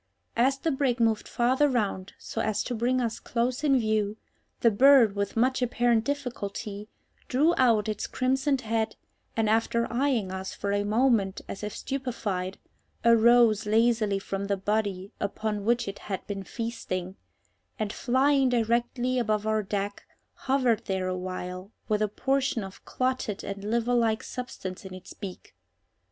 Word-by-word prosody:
As 265 +3 +3
the 320 +4 -1
brig 265 -3 0
moved 225 -2 +2
farther 260 +5 +2
round 205 -6 -1
so 225 - -4
as 215 -2 0
to 250 - -4
bring 245 +3 +1
us 230 -2 -2
close 245 +4 -1
in 275 -3 +4
view, 215 -2 0 0.4
the 230 - +5
bird, 250 -2 +6
with 200 +2 -2
much 255 +3 +2
apparent 240 -2 +2
difficulty, 215 -6 -4 0.4
drew 300 +7 +3
out 225 -4 +3
its 215 - -2
crimsoned 265 +1 +1
head, 225 -1 -1 0.4
and, 225 -1 +2
after 225 +2 +2
eyeing 240 -7 +1
us 190 0 -5
for 200 - -2
a 205 0 +1
moment 215 -2 +2
as 195 - -6
if 210 -1 -4
stupefied, 220 -9 -3 0.5
arose 230 -2 +5
lazily 220 -2 +3
from 195 0 -4
the 200 0 0
body 200 -1 -1
upon 210 0 -2
which 235 0 +2
it 200 - -5
had 195 -2 -5
been 200 -1 -4
feasting, 190 -4 -4 0.6
and, 215 -3 -2
flying 270 +1 +3
directly 240 +2 +1
above 215 -3 0
our 215 0 +1
deck, 200 0 -3 0.3
hovered 255 -5 +1
there 190 -1 -1
a 185 - -1
while 185 +1 -5 0.2
with 215 -1 +1
a 215 - +3
portion 270 +1 0
of 195 0 -10
clotted 255 -5 -2
and 200 0 -6
liver 235 +3 0
like 230 -2 +2
substance 245 -7 -6
in 190 -1 -8
its 185 0 -11
beak. 195 -4 -9
225 Hz, 155 wpm, -27 LUFS, 200-250 Hz, 0.6 s, bird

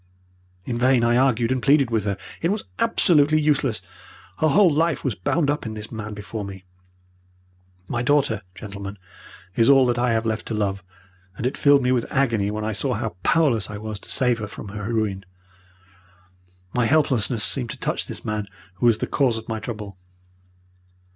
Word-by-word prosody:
"In 120 -1 -3
vain 125 -1 +4
I 120 0 +3
argued 120 -2 +2
and 130 -1 0
pleaded 140 -3 +4
with 110 -3 0
her. 100 -1 -1 0.2
It 165 - +1
was 210 +2 -1 0.2
absolutely 155 -9 +4
useless. 135 -9 +1 0.6
Her 155 - +3
whole 185 +3 +5
life 160 -1 +1
was 130 - 0
bound 140 - 0
up 145 - -3
in 110 -1 -5
this 105 0 -8
man 110 -2 -6
before 105 +1 -6
me. 95 -1 -8 1.2
My 120 - -2
daughter, 130 -5 +2
gentlemen, 100 -1 -7 0.6
is 115 +2 +4
all 135 -2 +7
that 120 -1 +1
I 120 -1 +2
have 110 0 0
left 110 -1 -2
to 110 - -2
love, 100 -2 -1 0.5
and - - -4
it 130 - 0
filled 140 -2 +4
me 125 - +2
with 125 -2 +1
agony 115 -7 +1
when 105 +1 -3
I 110 - -1
saw 125 +4 -1
how 110 -3 -3
powerless 135 - +2
I 105 - -6
was 105 -1 -6
to - - -14
save 125 -3 +1
her 105 - -4
from 100 - -9
her 105 +2 -5
ruin. 105 -4 -1 1.5
My 120 -2 +2
helplessness 125 -6 +1
seemed 125 -3 -2
to - - -6
touch - - -2
this - - -8
man 105 -1 -2 0.3
who 120 - +2
was 115 -2 +4
the - - -2
cause 125 -5 +1
of 110 - -8
my 110 -1 -3
trouble. 105 -5 -7
115 Hz, 190 wpm, -23 LUFS, 105-135 Hz, 1.5 s, all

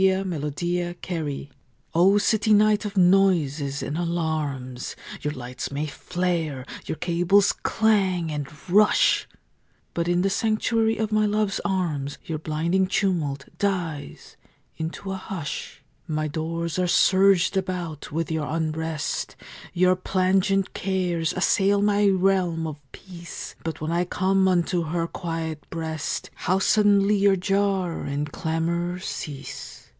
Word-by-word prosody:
In 190 -1 +2
a 150 - -4
City 175 +4 -1 0.3
Room 145 -4 -3 0.5
O 185 +5 +5
city 215 +1 +3
night 210 0 +4
of 205 -1 -5
noises 170 -7 +3
and 145 - -3
alarms, 155 -7 -2 0.3
Your 150 - -1
lights 125 0 -5
may 145 +2 -2
flare, 165 -4 -2 0.2
your - - -2
cables 175 +5 +3
clang 190 -7 +1
and 145 -2 -3 0.2
rush, 210 +4 +4 0.7
But 170 0 -1
in 175 +1 +2
the 195 - +2
sanctuary 225 +1 +1
of 220 -1 -1
my 215 0 +3
love's 210 -1 0
arms 160 -8 -1
Your 155 -2 -3
blinding 170 +5 0
tumult 165 -9 0
dies 175 -7 -3 0.4
into 165 +4 -5
a 190 - -3
hush. 185 -5 -6 0.2
My 155 -1 -1
doors 165 +3 -3
are 180 - +2
surged 190 +1 +4
about 180 -6 -3
with 165 +2 -2
your 155 -2 -1
unrest; 160 -1 -2 0.4
Your 185 +1 +3
plangent 190 +1 +1
cares 180 -4 -1
assail 195 +2 +3
my 205 0 +3
realm 185 -4 +2
of 150 -2 -6
peace; 175 -3 -9
But 160 -2 -4
when 155 +1 -2
I 175 +1 +1
come 190 +1 +2
unto 180 -1 +2
her 165 +2 -1
quiet 165 -3 -4
breast 160 -2 -4
How 185 +1 0
suddenly 205 0 +4
your 200 0 +4
jar 195 -2 0
and 145 +1 -3
clamor 170 +3 -1
cease! 150 -6 -6
175 Hz, 130 wpm, -25 LUFS, 160-195 Hz, 0.7 s, O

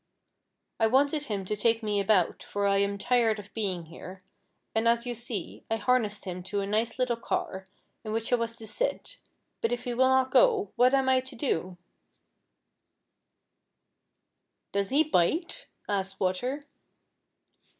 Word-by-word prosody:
I 225 - +4
wanted 285 +5 +2
him 200 -6 -3
to 210 - -2
take 225 +2 +2
me 210 -1 0
about, 195 -3 +2
for 205 0 -3
I 200 0 +3
am 200 0 +1
tired 230 0 +2
of 205 -1 -11
being 190 -6 -2
here, 185 +3 -11 0.5
and 225 +1 +2
as 235 +1 +3
you 245 - -2
see, 235 -5 -4
I 225 - +1
harnessed 225 -2 0
him 180 -1 -5
to 200 +2 -3
a - - -2
nice 215 +5 0
little 250 -2 +1
car, 190 -4 -3 0.4
in 215 - -5
which 225 +2 -1
I - - +8
was 230 -1 -2
to 225 - -11
sit, - - -2 0.4
but 230 - 0
if 245 0 -2
he 245 -2 -3
will 260 +2 +3
not 260 0 +3
go, 445 -5 +4
what 250 +2 +5
am 270 -1 +2
1 260 -1 +3
to 260 0 -7
do 185 - -2 1.4
?" - - -52
"Does 200 -1 0
he 290 +4 +4
bite 315 - 0 0.2
V - - -3
asked 195 -1 -2
Water. 245 +10 -1
225 Hz, 170 wpm, -28 LUFS, 200-255 Hz, 1.4 s, I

